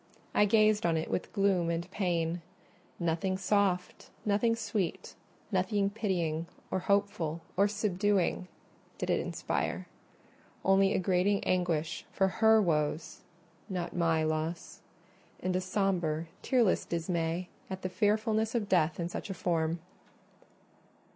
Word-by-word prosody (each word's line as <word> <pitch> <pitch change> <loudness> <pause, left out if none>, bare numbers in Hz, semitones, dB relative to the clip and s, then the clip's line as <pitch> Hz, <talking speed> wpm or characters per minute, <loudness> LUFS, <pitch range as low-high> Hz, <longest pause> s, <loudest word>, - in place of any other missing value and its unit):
I 210 - +5
gazed 215 0 +4
on 165 -1 +2
it 160 - -3
with - - -2
gloom 195 -4 +2
and 170 0 -1
pain: 175 -3 -1 0.6
nothing 170 +2 0
soft, 195 -2 0 0.2
nothing 210 +3 +2
sweet, 220 -5 -3 0.4
nothing 195 +1 +1
pitying, 175 -7 -1 0.2
or - - +1
hopeful, 185 -5 0
or 200 +2 +4
subduing 200 -3 0 0.5
did - - -1
it - - +2
inspire; - - -2 0.8
only 195 0 +4
a - - +3
grating 190 +2 +2
anguish 175 -3 0
for 195 - +2
her 220 0 +7
woes—not 170 +2 -3
my 165 -2 +2
loss—and 160 +3 -5
a 185 - +1
sombre 180 -5 0 0.2
tearless 240 -7 +3
dismay 170 +1 -2 0.2
at 190 0 -6
the - - 0
fearfulness 215 +3 +1
of 220 -3 0
death 170 -4 +2
in 170 - -1
such 175 - -6
a 195 - -3
form. 165 -2 0
185 Hz, 120 wpm, -31 LUFS, 170-205 Hz, 0.8 s, her